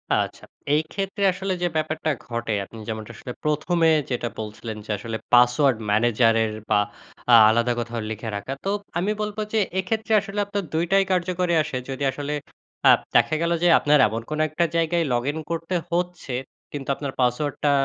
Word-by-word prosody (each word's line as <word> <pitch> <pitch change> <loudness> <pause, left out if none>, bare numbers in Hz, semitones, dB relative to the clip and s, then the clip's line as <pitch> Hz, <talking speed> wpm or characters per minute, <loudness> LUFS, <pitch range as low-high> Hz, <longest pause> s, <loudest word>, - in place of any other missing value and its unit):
আচ্ছা। - - -2 0.3
এই 155 - +4
ক্ষেত্রে 195 0 -3
আসলে 190 +1 -2
যে 175 - +2
ব্যাপারটা 155 0 -1 0.2
ঘটে 115 -2 -2
আপনি 115 - -13
যেমনটা 110 0 -5
আসলে 125 - -7
১ম 150 +3 0
এ - - +5 0.2
যেটা 120 -1 -1
বলছিলেন 110 +1 -6
যে - - -19
আসলে 110 +2 -5 0.2
পাসওয়ার্ড 125 +1 +5
ম্যানেজারের 115 0 +3 0.2
বা 105 - +4 0.5
আ - - +7 0.2
আলাদা 120 +2 +2
কোথাও 120 0 -3
লিখে 110 +1 -5
রাখা। 100 +7 -4
তো - - 0 0.3
আমি 190 +5 0
বলব 210 0 -3 0.2
যে 220 - +3 0.2
এক্ষেত্রে 220 +3 -1
আসলে 200 +1 -5
আপনার 200 0 -3
২ 165 +2 +1
টাই 195 0 +5
কার্যকরী 180 -1 0
আসে, 150 -3 -4
যদি 135 +1 -4
আসলে 145 +1 -4 0.5
অ্যাপ - - +7 0.2
দেখা 155 - +4
গেলো 170 0 +2
যে 175 - +5
আপনার 150 0 +4
এমন 110 +2 -3
কোনো 155 0 -1
একটা 170 +3 +1
জায়গায় 165 +1 +2
লগইন 135 +6 -1
করতে 165 +2 -2 0.2
হচ্ছে 175 -5 -2 0.4
কিন্তু 140 -2 -6
আপনার 140 -1 -4
পাসওয়ার্ডটা 145 +4 +1
150 Hz, 175 wpm, -24 LUFS, 120-175 Hz, 0.5 s, আ